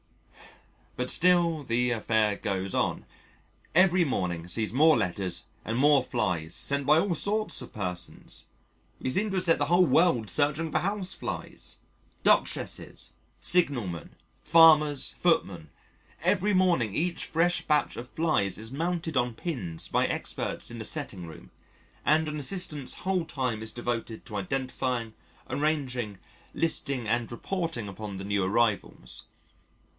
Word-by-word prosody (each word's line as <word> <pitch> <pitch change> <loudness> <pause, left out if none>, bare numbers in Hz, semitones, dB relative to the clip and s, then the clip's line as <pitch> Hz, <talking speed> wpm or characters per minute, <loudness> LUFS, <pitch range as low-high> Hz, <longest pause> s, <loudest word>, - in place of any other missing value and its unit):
But 125 0 0
still 170 -3 +4
the 125 0 +1
affair 110 -2 +1
goes 95 -1 -3
on. - - 0 0.7
Every 185 0 +5
morning 90 - -2
sees 110 +4 -1
more 155 +3 +6
letters 90 -1 -2 0.2
and 115 +1 -2
more 145 +1 +5
flies 90 -10 -2
sent 140 0 0
by 150 +2 +6
all 180 -1 0
sorts 215 +6 0
of - - -9
persons 90 -4 -5 0.5
we - - -2
seem 210 +9 +2
to 195 - -3
have 185 - +1
set 165 -2 +4
the 145 - +2
whole 175 +4 +4
world 160 -11 +3
searching 150 +2 +1
for - - +2
Houseflies 180 - -4 0.5
Duchesses, - - 0 0.3
signalmen, 120 - 0 0.3
farmers, 150 -3 +6
footmen. 95 - +1 0.5
Every 195 +3 +2
morning 170 - +2
each 170 +1 -1
fresh 175 +2 +1
batch 150 -1 +2
of 125 +1 -7
flies 155 - 0
is 110 +2 -6
mounted 165 +2 -2
on 120 -2 +1
pins 100 - -4
by - - +1
experts - - -3
in 120 - -7
the 110 - -4
Setting 105 - -4
Room, 80 - -12 0.5
and 155 +1 +3
an 150 0 -3
Assistant's 150 -3 0
whole 185 -3 +1
time 125 -7 -2
is 110 0 -3
devoted 120 -1 -4
to 105 - -8
identifying, 125 +1 -2 0.3
arranging, 130 -8 -1 0.4
listing 140 -7 -1
and 120 +1 0
reporting 165 - -3
upon 100 0 -7
the 95 - -6
new 100 -1 0
arrivals. 105 +2 -1
130 Hz, 140 wpm, -28 LUFS, 110-165 Hz, 0.7 s, more